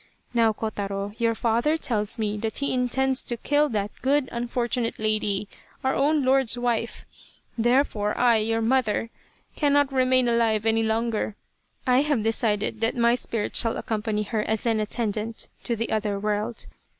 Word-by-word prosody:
Now, 230 -2 +4
Kotaro, 200 -2 -4
your 230 -1 +1
father 235 +8 +1
tells 215 -9 +1
me 210 -2 -1
that 220 +1 -3
he 280 - 0
intends 260 +1 +1
to 240 - -3
kill 290 +5 +1
that 210 -2 -2
good 275 0 +1
unfortunate 240 0 -2
lady, 215 -2 0 0.4
our 265 0 +1
own 290 0 +2
lord's 260 -2 +3
wife 235 -1 -2 0.5
therefore, 235 -3 +1
I, 240 -2 +4
your 225 +1 0
mother, 230 -2 +1 0.4
cannot 285 -2 +2
remain 255 -1 +3
alive 225 -2 +2
any 225 0 +2
longer 220 -1 -1 0.5
I 255 0 +4
have 290 -7 0
decided 220 -1 0
that 225 +2 +1
my 235 0 +4
spirit 230 -3 -2
shall 230 - +2
accompany 215 -1 -2
her 215 +1 -2
as 220 +1 -2
an 225 -2 +2
attendant 215 0 -2 0.2
to 235 - 0
the 230 +1 -3
other 210 -2 -1
world. 210 +2 -2
230 Hz, 155 wpm, -25 LUFS, 215-250 Hz, 0.5 s, Now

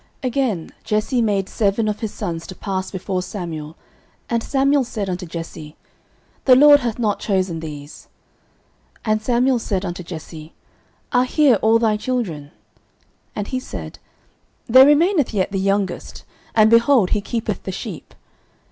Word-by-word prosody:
09:016:010 - - 0
Again, 235 -10 -1
Jesse 215 +4 0
made 200 -4 0
seven 215 +1 0
of 210 0 -2
his 220 -2 -4
sons 165 -1 -5
to 185 - -8
pass 190 -1 -3
before 190 -1 -3
Samuel. 165 -5 -6 0.6
And 235 -1 +1
Samuel 275 +2 +2
said 220 -5 -4
unto 180 0 -5
Jesse, 165 -2 -8 0.7
The 255 - +7
LORD 290 +2 +8
hath 235 -5 -3
not 215 -4 0
chosen 185 -5 -1
these. 150 -2 -9 1.0
09:016:011 215 - +1
And 215 0 +1
Samuel 245 +2 +2
said 195 -3 -2
unto 175 0 -5
Jesse, 160 -2 -9 0.6
Are 250 -1 +3
here 280 -1 +4
all 220 +1 +4
thy 220 -2 +1
children? 210 - -3 0.9
And 205 -1 -4
he 255 - -2
said, 255 - -8 0.7
There 260 +3 +7
remaineth 300 - +3
yet 190 0 0
the 195 - -1
youngest, 195 -1 -2 0.3
and, 220 0 +5
behold, 230 -3 +4
he 210 - +1
keepeth 230 +2 -3
the - - -5
sheep. - - -8
210 Hz, 155 wpm, -20 LUFS, 180-245 Hz, 1.0 s, LORD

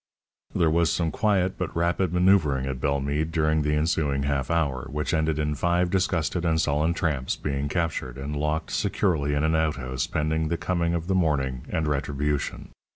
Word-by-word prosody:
There 80 -2 +3
was 85 0 +3
some 85 -2 0
quiet, 95 -3 +1
but 90 - -3
rapid, 85 +2 +1
mavoeuvring 90 -7 +3
at 65 -2 -4
Bellemeade 70 +2 0
during 80 -1 +2
the 75 0 +1
ensuring 75 -3 0
half 70 -2 -1
hour, 70 -7 0
which 75 +3 -2
ended 80 -1 +1
in 75 0 0
five 85 +3 +1
disgusted 90 -3 0
and 80 -2 +2
sullen 75 +2 +1
tramps 70 -6 -1
being 70 0 -3
captured, 80 -7 -2
and 70 +2 -4
locked 75 +2 -1
securely 85 -8 0
in 75 - 0
an 80 0 +2
outhouse 70 -5 -1
pending 80 +1 0
the 85 - -1
coming 85 0 0
of 85 -1 -2
the 95 - 0
morning 70 -8 0
and 80 -1 -1
retribution. 75 0 -2
80 Hz, 175 wpm, -26 LUFS, 70-85 Hz, -, There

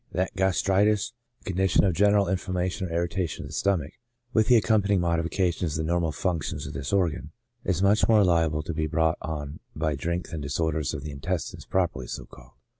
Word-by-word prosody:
that 95 +1 -1
gastritis^ 95 +2 +2 0.3
a - - -2
con - - -5
dition 95 +1 +3
of 95 - +2
general 100 +2 +4
inflammation 95 0 -1
or - - -9
irritation 85 0 -2
of - - -9
the - - -10
stomach, 90 -7 0 0.4
with 110 -2 +3
the 125 - +6
accompanying 105 -2 +3
modifications 85 -1 0
of 80 - -1
the - - -2
normal 85 -1 +1
func 85 0 -1
tions - - -4
of 70 - -6
this 70 -1 -4
organ, 90 -5 0 0.3
is 90 0 0
much 105 +3 +4
more 110 -2 +6
hable 80 -3 +2
to 85 - -3
be 80 0 -1
brought 80 +1 +1
on 75 -3 -5 0.2
by 80 0 0
drink 85 +5 -3
than 80 -3 -5
disorders 75 +1 -1
of 70 - -6
the 75 - -5
intestines 80 +5 -4
properly 85 -9 -1
so - - -6
called. - - -16
85 Hz, 200 wpm, -26 LUFS, 80-95 Hz, 0.4 s, the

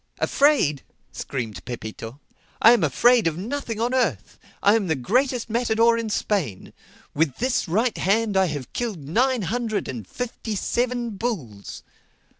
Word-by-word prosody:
"Afraid!" 275 - +2 0.3
screamed 110 -9 -5
Pepito. 115 +1 -7 0.4
"I 230 - +8
am 240 - +4
afraid 240 -4 +4
of 160 -1 -1
nothing 230 +2 -4
on 240 +2 0
earth. 180 - -1 0.2
I 205 - +6
am 210 -4 0
the 160 - +1
greatest 245 - 0
matador 230 0 +2
in 230 -1 -3
Spain. 180 - -2 0.4
With 150 -3 +1
this 255 -4 0
right 220 +7 +1
hand 210 +2 +1
I 190 0 +4
have 145 -5 -6
killed 220 -11 -3
nine 245 - +1
hundred 225 +2 -2
and 115 -7 -6
fifty 230 - -5
seven 240 +3 -1
bulls." 150 - -5
215 Hz, 145 wpm, -23 LUFS, 150-240 Hz, 0.4 s, I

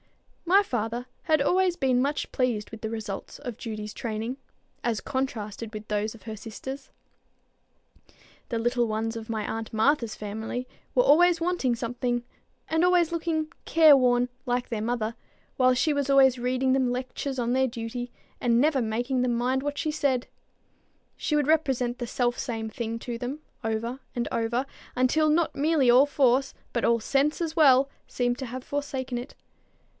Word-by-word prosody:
My 385 +4 +5
father 240 - -2 0.2
had 310 -2 +3
always 365 +3 +2
been 255 -2 +2
much 285 +3 -1
pleased 240 -6 -1
with 225 -1 -9
the 220 - -3
results 220 -3 -5
of 245 -5 -6
Judy's 215 -2 -6
training, 225 +2 -3 0.5
as 230 -3 0
contrasted 230 -4 -4
with 215 0 -7
those 210 +1 -1
of 225 - -16
his 220 -2 -7
sister's. 265 +5 -7 1.6
The 235 - -1
little 240 +1 +1
ones 225 +1 -2
of 225 0 -7
my 220 -2 -2
aunt 225 0 -4
Martha's 230 +1 +2
family 220 +4 -5 0.3
were - - +5
always 350 -1 +5
wanting 335 -8 +1
something, 240 0 -2 0.4
and 320 +1 +1
always 355 -2 +4
looking 320 -2 -1
care 315 -3 +7
worn 245 -2 +3 0.2
like 245 -1 -1
their 225 -3 -2
mother, 230 0 -1 0.4
while 255 -1 +4
she 300 +5 +2
was 285 -1 -1
always 265 -2 +6
reading 255 +1 +1
them 260 -2 +2
lectures 255 +2 -3
on 240 0 0
their 265 0 +3
duty, 240 0 -5 0.3
and 235 -2 +3
never 285 -1 +3
making 240 +3 -1
them 245 -1 +1
mind 255 +2 +1
what 290 0 -3
she 310 - -1
said. 275 -5 0 0.9
She 300 - -1
would 295 -2 +2
represent 265 -6 +1
the 240 - -3
self 240 +1 0
same 225 -2 -3
thing 230 0 -4
to 235 0 -5
them 255 +5 -4 0.2
over 225 +3 -2 0.2
and 240 -1 -1
over, 235 +3 0 0.3
until 280 +5 +3
not 320 +2 +2
merely 290 -3 +3
all 260 +4 +6
force, 270 -1 +2 0.2
but 235 - 0
all 235 0 +3
sense 280 +6 +1
as 325 -2 -2
well, 275 -4 +6 0.2
seemed 245 0 -1
to 265 - -4
have 250 +2 -6
forsaken 265 -3 -3
it. 245 - -9
250 Hz, 170 wpm, -27 LUFS, 230-280 Hz, 1.6 s, care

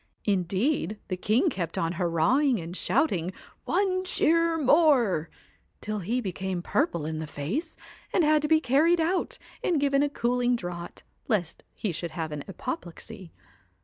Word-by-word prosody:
Indeed 200 - 0
the 185 - 0
king 220 - +2
kept 170 -3 -4
on 165 0 0
hurrahing! 185 - +2
and 170 +1 -7
shouting 185 - +1 0.3
One 370 -2 +1
cheer 335 -2 +2
more! 265 - +4 0.5
till 215 0 -3
he 220 +7 -1
became 190 -3 -3
purple 175 - 0
in 155 0 -3
the 160 - -4
face, 200 - -4 0.3
and 355 - +3
had 305 0 +4
to 300 - 0
be 315 0 +5
carried 315 +5 +3
out 345 +3 0 0.3
and 340 -5 +2
given 280 0 +2
a 290 - +2
cooling 245 -2 +1
draught 175 -5 -6 0.2
lest 180 -7 -1
he 210 - -2
should 170 +1 -4
have 160 -2 -3
an 145 -1 -5
apoplexy. 175 -1 -7
215 Hz, 150 wpm, -27 LUFS, -, 0.5 s, be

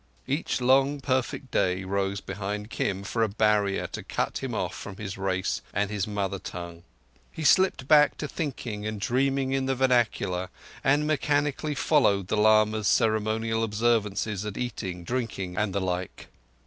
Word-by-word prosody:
Each 140 +2 -1
long, 135 +3 +3
perfect 130 0 -2
day 90 +1 +1
rose 100 +1 -1
behind 105 +2 -5
Kim 100 0 -2
for 115 +3 -2
a 110 - +3
barrier 105 -1 +2
to - - -5
cut - - -2
him - - -4
off - - -2
from 95 -2 -8
his 100 -2 -5
race 95 -1 -1
and 105 0 0
his 105 -2 -1
mother 100 -2 -2
tongue. 85 -2 -7 0.5
He 160 - -6
slipped 185 -3 +4
back 150 -1 +5
to 150 - -3
thinking 120 -9 -4
and 110 -1 -4
dreaming 135 +4 +1
in 135 0 0
the 135 - +1
vernacular, 110 -8 +1 0.3
and 145 +2 +3
mechanically 150 0 0
followed 100 - +2
the 110 - +1
lama's 110 0 +4
ceremonial 110 0 +1
observances 105 -2 0
at 105 -1 -5
eating, 95 -7 -4
drinking, 100 -5 -3
and 105 +1 0
the 100 - -1
like. 90 -1 -4
110 Hz, 160 wpm, -27 LUFS, 100-130 Hz, 0.5 s, back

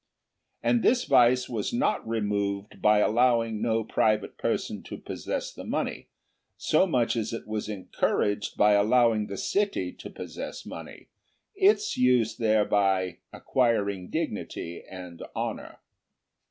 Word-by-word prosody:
And 240 - +3
this 250 +2 +3
vice 125 - +4
was 110 -4 -3
not 240 - 0
removed 100 -2 -2
by 105 0 +5
allowing 115 -1 +2
no 115 -1 +1
private 110 -1 +1
person - - -2
to - - -8
possess - - -5
money, - - -3 0.5
so 155 +5 +2
much 125 -9 +1
as 115 0 -2
it 115 - -5
was 110 0 -3
encouraged 105 0 -1
by 105 0 +5
allowing 110 +1 +3
the 100 - -6
city 195 - 0
to - - -8
possess - - -7
money, - - -10 0.4
its 410 +1 +3
use 125 -3 +3
thereby 100 -5 +1
acquiring 100 -7 0
dignity 85 +1 -4
and 90 -2 -9
honour. - - -4
110 Hz, 125 wpm, -27 LUFS, 100-125 Hz, 0.5 s, by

